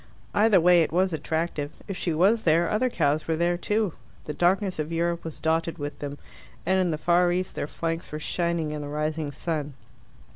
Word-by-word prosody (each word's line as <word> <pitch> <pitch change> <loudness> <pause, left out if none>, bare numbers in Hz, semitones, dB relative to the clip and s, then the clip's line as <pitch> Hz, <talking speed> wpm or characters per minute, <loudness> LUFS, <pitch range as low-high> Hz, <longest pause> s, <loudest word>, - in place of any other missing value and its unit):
Either 210 -2 +5
way 175 0 +6
it 160 - 0
was 185 +1 +2
attractive. 160 -2 -2 0.2
If 195 - -4
she 175 - -1
was 195 +8 +3
there, 165 -1 +3
other 255 +4 +1
cows 150 -7 0
were 165 - +1
there 170 +2 +1
too. 210 +1 0 0.3
The 150 - -4
darkness 185 +3 +1
of 155 +1 -2
Europe 170 +1 -1
was 160 -2 -7
dotted 165 +1 0
with 145 -1 -5
them, 145 0 -5 0.5
and 190 +2 +3
in 185 -2 +2
the 155 - -1
far 175 +2 +3
East 185 +1 -1
their - - -3
flanks 165 +2 -4
were 150 - -4
shining 170 -1 -1
in 150 -1 -4
the 145 - -5
rising 150 0 -2
sun. 150 -1 -3
165 Hz, 205 wpm, -26 LUFS, 155-180 Hz, 0.5 s, way